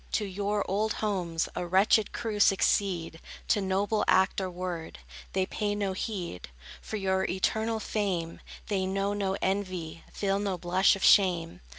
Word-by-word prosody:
To 210 - +1
your 205 +1 -1
old 215 +3 0
homes 180 -6 -1
A 175 - -3
wretched 195 +4 +3
crew 225 -3 -4
succeed; 185 -4 +2 0.3
to 210 - +3
noble 195 +3 0
act 190 +1 +3
or 190 - -2
word, 175 - -5 0.4
They 190 0 +1
pay 205 +1 -2
no 200 -2 -1
heed; 185 - -5 0.3
for 215 - -5
your 190 -1 0
eternal 220 +4 0
fame 190 -7 -2 0.3
They 190 -2 0
know 195 +1 -1
no 195 -1 -1
envy, 185 -4 -2
feel 195 -1 -1
no 200 -3 -2
blush 185 +3 +3
of 195 - -6
shame. 175 -4 +4
195 Hz, 155 wpm, -28 LUFS, 185-205 Hz, 0.4 s, shame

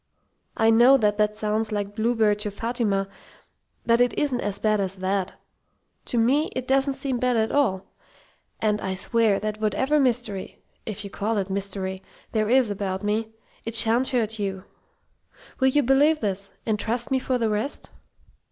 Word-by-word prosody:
I 225 0 +4
know 240 +4 +6
that 210 -4 +1
that 210 0 +1
sounds 215 +1 -1
like 205 -1 -3
Bluebeard 220 -1 +1
to 210 - -3
Fatima, 205 -2 -1 0.8
but 235 +1 +3
it 245 -2 +1
isn't 265 -4 0
as 205 -1 -2
bad 215 0 +1
as 195 -1 -2
that. 190 0 -2 0.7
To 240 - -1
me, 270 +7 +2
it 255 0 -4
doesn't 270 +1 +2
seem 265 -2 -3
bad 250 -1 +1
at 220 0 +1
all. 205 -10 +1 0.7
And 210 -1 0
I 190 0 -2
swear 220 +1 +1
that 215 0 -4
whatever 265 +8 +1
mystery 240 -7 -1 0.3
if 215 -1 -5
you 200 - -8
call 215 +3 -2
it 195 -1 -2
'mystery' 190 -1 -3 0.3
there 215 -1 0
is 250 -3 +4
about 195 -1 -3
me, 215 +2 -1 0.3
it 230 0 -3
sha'n't 230 +3 +5
hurt 225 -3 -1
you. 195 -2 -3 1.0
Will 265 - +4
you 290 +2 +3
believe 285 +5 +4
this 195 -3 -3
and 215 -2 0
trust 235 +4 -2
me 265 - +2
for 255 0 -1
the 230 -2 0
rest?" 215 +7 -4
220 Hz, 170 wpm, -24 LUFS, 205-245 Hz, 1.0 s, know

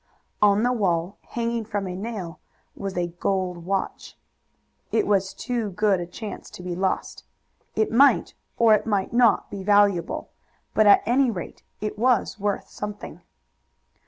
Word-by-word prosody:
On 205 +1 +4
the 245 +1 +2
wall, 185 -3 -1
hanging 235 -1 -3
from 205 -2 -3
a 180 -1 -5
nail, 195 -4 -6 0.4
was 195 -2 -5
a 175 -1 0
gold 185 -3 -1
watch. 195 0 -3 0.7
It 420 - +2
was 195 -1 +1
too 240 -4 -3
good 200 0 +1
a 175 - -5
chance 205 +3 -8
to 180 - -10
be 180 -1 -4
lost. 190 +1 -2 0.5
It 220 - +1
might 275 +5 +4 0.2
or 230 -2 +6
it 215 - +1
might 205 -1 0
not 235 -3 +3
be 200 - -5
valuable, 200 -4 +2 0.4
but 215 -1 +4
at 205 - +7
any 255 +3 +3
rate 185 -7 -6 0.2
it 210 0 -4
was 240 -3 +2
worth 205 0 -2
something. 210 0 -7
205 Hz, 155 wpm, -24 LUFS, 190-225 Hz, 0.7 s, at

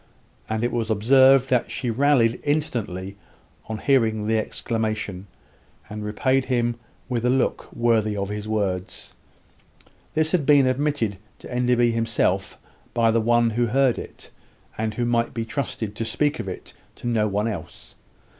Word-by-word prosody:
and 110 +1 -1
it 120 - 0
was 115 -2 -2
observed 130 +5 +5
that 125 -2 +2
she 120 - -2
rallied 125 -2 +2
instantly 110 - -2 0.5
on 110 - -3
hearing 110 -4 +2
the 110 +1 +1
exclamation, 110 -3 -2 0.6
and 105 0 -5
repaid 130 +5 +1
him 120 -2 0 0.3
with 120 -2 -2
a 125 - +2
look 130 0 0
worthy 110 -3 +1
of 100 0 -2
his 105 0 -5
words. 95 -4 -3 1.0
This 155 0 +2
had 180 -5 +2
been 140 -1 +5
admitted 130 -6 0 0.2
to - - -10
Enderby 125 -1 +2
himself 115 -4 0 0.4
by 115 -1 +3
the 115 0 +2
one 120 0 +3
who 120 +2 +1
heard 130 +1 +2
it, - - -11 0.4
and 110 -1 -3
who 120 - -1
might 120 -1 0
be 115 -1 -2
trusted 110 -4 -4
to - - -1
speak 145 +5 0
of 110 - -4
it 95 - -7 0.2
to - - -13
no 115 -3 +1
one 105 +2 -1
else. 90 -6 -7
115 Hz, 155 wpm, -23 LUFS, 105-125 Hz, 1.0 s, observed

